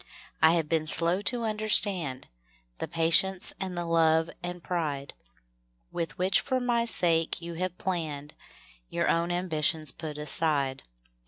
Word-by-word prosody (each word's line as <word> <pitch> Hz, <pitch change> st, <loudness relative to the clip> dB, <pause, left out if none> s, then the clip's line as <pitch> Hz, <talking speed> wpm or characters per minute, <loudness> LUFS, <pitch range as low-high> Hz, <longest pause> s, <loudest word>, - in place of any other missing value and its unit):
I 160 Hz, +1 st, +6 dB
have 165 Hz, -3 st, 0 dB
been 155 Hz, -1 st, -1 dB
slow 170 Hz, +4 st, +4 dB
to 235 Hz, +3 st, +3 dB
understand 205 Hz, -, +1 dB, 0.5 s
The -, -, -4 dB
patience 165 Hz, +3 st, +2 dB
and 185 Hz, -2 st, -5 dB
the 175 Hz, -, -3 dB
love 165 Hz, -1 st, +2 dB
and 175 Hz, 0 st, -7 dB
pride 150 Hz, -6 st, -3 dB, 0.8 s
"With 165 Hz, -3 st, -5 dB
which 185 Hz, +1 st, +1 dB
for 260 Hz, -, -1 dB
my 240 Hz, -2 st, 0 dB
sake 165 Hz, -7 st, +1 dB
you 170 Hz, 0 st, -7 dB
have 180 Hz, +1 st, -3 dB
hour 150 Hz, -, -5 dB
own 170 Hz, +1 st, 0 dB
ambitions 160 Hz, -3 st, 0 dB
put 155 Hz, -2 st, -8 dB
aside. 145 Hz, -3 st, 0 dB
165 Hz, 135 wpm, -27 LUFS, 155-185 Hz, 0.8 s, I